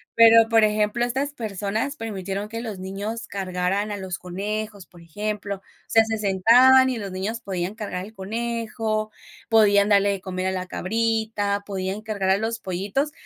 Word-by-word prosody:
Pero, 230 0 +7
por 225 -1 +5
ejemplo, 215 +2 +2
estas 270 +4 -2
personas 220 +3 -3
permitieron 200 -3 -4
que 230 +1 -5
los 220 -4 -5
niños 200 +5 -5
cargaran 190 +2 -2
a 205 - -3
los 190 -2 -5
conejos, 205 +2 -4
por 175 +2 -17
ejemplo. 205 +4 -4
O - - -24 0.3
sea, 225 0 +5
se 220 0 -2
sentaban 240 +7 +6
y 250 - -3
los 200 -3 -5
niños 200 +5 -3
podían 185 -2 -3
cargar 205 -4 -5
el 215 - -13
conejo, 220 +1 -3 0.4
podían 205 -2 +5
darle 200 -1 +4
de 195 -1 -3
comer 185 0 -4
a - - +1
la 185 -1 -4
cabrita, 220 -1 -1
podían 195 +1 -3
cargar 205 -4 -2
a 190 - +4
los 225 +2 -2
pollitos. 200 +10 -2
210 Hz, 170 wpm, -24 LUFS, 190-225 Hz, 0.4 s, Pero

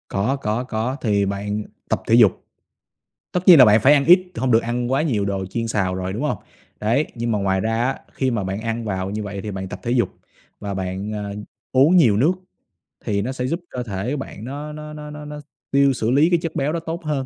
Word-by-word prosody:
Có, 105 +8 0
có, 120 -3 -2
có, 125 +1 -2
thì 100 -3 +2
bạn 100 +2 -3 0.3
tập - - 0
thể 115 - +5
dục. 110 -6 +4 0.9
Tất 180 - +1
nhiên 175 -4 +10
là 130 - +10
bạn 105 0 +5
phải 135 - +6
ăn 140 -1 +3
ít, 180 +3 +5
t - - -7
hông 130 - 0
được 115 -1 +4
ăn 120 +1 -2
quá 135 - +2
nhiều 115 -11 0
đồ 95 -1 -2
chiên 115 +4 -3
xào 95 -4 0
rồi, 95 0 -3
đúng 110 +7 -4
hông? 150 - -1 0.4
Đấy, 120 +8 +1
nhưng 120 0 -2
mà 105 - +1
ngoài 95 -1 +1
ra 115 +3 0
á, 130 +2 -1
khi 130 -1 0
mà 110 -5 -1
bạn 95 +2 -3
ăn 115 +1 -3
vào 95 -2 -3
như 105 +1 -3
vậy 100 -1 -5
thì 105 - -5
bạn 95 -1 -5
tập 95 - -8
thể 120 - -3
dục 120 -6 +2 0.5
và 100 -1 -4
bạn, 95 +2 -4
à, 105 -1 -4 0.4
uống 140 +7 +5
nhiều 120 - +5
nước 145 - +3 0.7
thì 100 -3 0
nó 120 +6 -2
sẽ 125 -1 -3
giúp 165 +5 -1
cơ 125 - -4
thể 110 +4 -3
bạn 125 -6 -7
nó 145 +4 -6
nó 150 0 -8
nó 150 0 -8
nó 150 0 -8
nó 150 0 -7
x - - -12 0.3
tiêu 140 0 +4
xử 115 -2 -1
lý 145 +6 +4
cái 175 -1 +3
chất 165 -1 -4
béo 145 +2 0
đó 170 - -1
tốt 165 +1 -6
hơn. 145 -3 -1
120 Hz, 255 wpm, -21 LUFS, 100-140 Hz, 0.9 s, nhiên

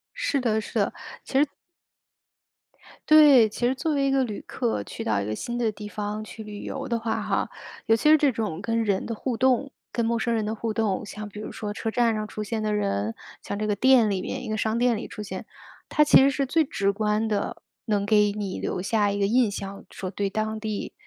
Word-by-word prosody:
是 330 - 0
的 220 -3 +1
是 210 - -10
的， - - +1 0.4
其 270 - +5
实 300 - +3 1.6
对， 290 -7 +8
其 240 +3 -2
实 255 - +2
作 300 +3 -1
为 275 -1 +2
一 - - +2
个 270 0 +3
旅 215 -4 -5
客 230 - -2
去 - - -7
到 105 -2 +1
一 100 - -3
个 110 - -2
新 240 - -4
的 230 -3 +1
地 210 0 -8
方 210 +1 -4
去 220 0 -9
旅 205 -1 -8
游 - - -5
的 235 - 0
话 225 0 -2
哈， - - -1 0.4
尤 225 - +5
其 265 - +2
是 310 - +8
这 290 -2 +3
种 205 -7 -3
跟 230 +1 0
人 200 -3 0
的 230 - -3
互 240 +2 -3
动， 260 +2 +2 0.2
跟 235 -1 -1
陌 235 - +1
生 235 +1 0
人 220 -2 0
的 215 +1 -2
互 225 0 -3
动， 215 -4 0
像 210 +1 -7
比 210 +1 -9
如 - - -6
说 210 -1 -5
车 225 +1 -3
站 235 0 +2
上 215 0 -3
出 215 - -5
现 220 +1 -3
的 215 - 0
人， 105 - -1 0.3
像 200 - -4
这 215 - -1
个 210 - +1
店 245 0 +5
里 190 -2 -1
面， - - -4
一 - - -6
个 215 - -1
商 220 +1 0
店 240 -1 +3
里 210 - -6
出 210 - -7
现。 190 0 -6 0.4
它 300 - +4
其 295 - +7
实 275 +1 +6
是 275 0 -1
最 315 +4 +2
直 200 -9 0
观 210 +1 0
的 210 -2 -2 0.3
能 205 -2 0
给 210 -1 +4
你 200 -2 -4
留 - - -2
下 205 +1 +1
一 200 - -2
个 200 - +2
印 235 +1 +3
象， 195 0 -6
说 185 - -5
对 195 +1 -2
当 215 +1 -2
地 215 -2 -4
220 Hz, 260 characters per minute, -25 LUFS, 205-240 Hz, 1.6 s, 对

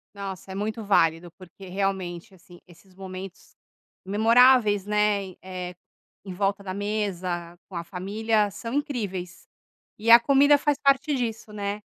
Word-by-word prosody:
Nossa, 195 -2 -7
é - - -6
muito 215 +3 -3
válido, 165 -3 +2
porque 185 +1 -13
realmente, 190 -1 -3
assim, 175 -1 -17
esses 180 +2 -20
momentos 190 0 -10 0.5
memoráveis, 220 0 +4
né. 210 -1 +1
E, 185 - -13
eh, 180 -1 -6 0.5
em 190 - -6
volta 200 +1 -1
da 185 -1 -5
mesa, 185 -4 -3
com 190 - -10
a 170 - -3
família, 205 +4 -1
são 230 +4 -7
incríveis 205 -11 -4 0.5
e 225 +2 0
a 235 0 +10
comida 280 +3 +5
faz 290 -1 0
parte 275 +2 +2
disso, 225 -4 -4
né. 205 0 -4
200 Hz, 145 wpm, -25 LUFS, 185-220 Hz, 0.5 s, a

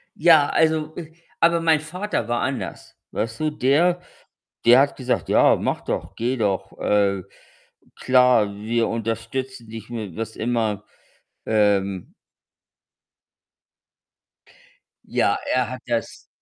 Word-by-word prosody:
ja, 155 -3 +5
also, 160 -1 +1
äh, 160 -2 -8 0.3
aber 170 0 +3
mein 160 -2 +3
Vater 180 - -4
war 120 0 -1
anders. 130 -1 -5
Weißt 115 0 -3
du, 155 - 0
der 165 +6 +2 0.6
der 120 +2 +8
hat 140 0 +2
gesagt: 130 -1 -2
„Ja, - - +5
mach - - -2
doch, 95 +3 -4
geh 125 +3 -1
doch. 100 -3 -2
Äh, 100 -2 +1 0.7
klar, 125 -5 +3
wir 115 +3 -1
unterstützen 115 +2 -4
dich 110 0 -9
mit 110 -7 -6
was 110 0 -5
immer.“ 110 -3 -1 0.6
Ähm 100 - +1 2.9
ja, - - +1 0.2
er 125 -1 +1
hat 130 - -7
das 120 -2 -4
120 Hz, 115 wpm, -22 LUFS, 110-145 Hz, 2.9 s, der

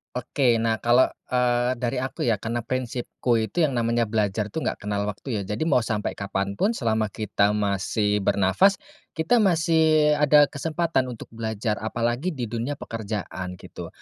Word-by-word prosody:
Oke. 125 -2 +1
Nah, 115 0 +1
kalau, 120 +2 +5 0.2
eee, 125 0 +2
dari 120 -2 -1
aku, 130 +1 -4
ya, 115 - +3
karena 115 +3 -3
prinsipku 120 -1 -2
itu 160 +10 0
yang 145 - +2
namanya 115 -1 +1
belajar, 105 -1 -1
tuh, 160 - -3
enggak - - -3
kenal 105 0 -2
waktu, 105 +2 -4
ya. - - -3
Jadi 155 - -2
mau 145 -6 +3
sampai 110 -2 -2
kapan 100 0 -3
pun, 225 +3 +2
selama 110 -3 0
kita 105 0 0
masih 105 +1 0
bernapas, 100 - +3 0.4
kita 165 +9 +2
masih 160 -5 +3
ada 150 -1 +5
kesempatan 155 -2 -1
untuk 120 -3 -9
belajar. 110 -1 -3
Apalagi 120 +7 -2
di 125 - -4
dunia 120 +5 -3
pekerjaan, 100 -6 -5
gitu. - - -9
115 Hz, 165 wpm, -24 LUFS, 105-135 Hz, 0.4 s, kalau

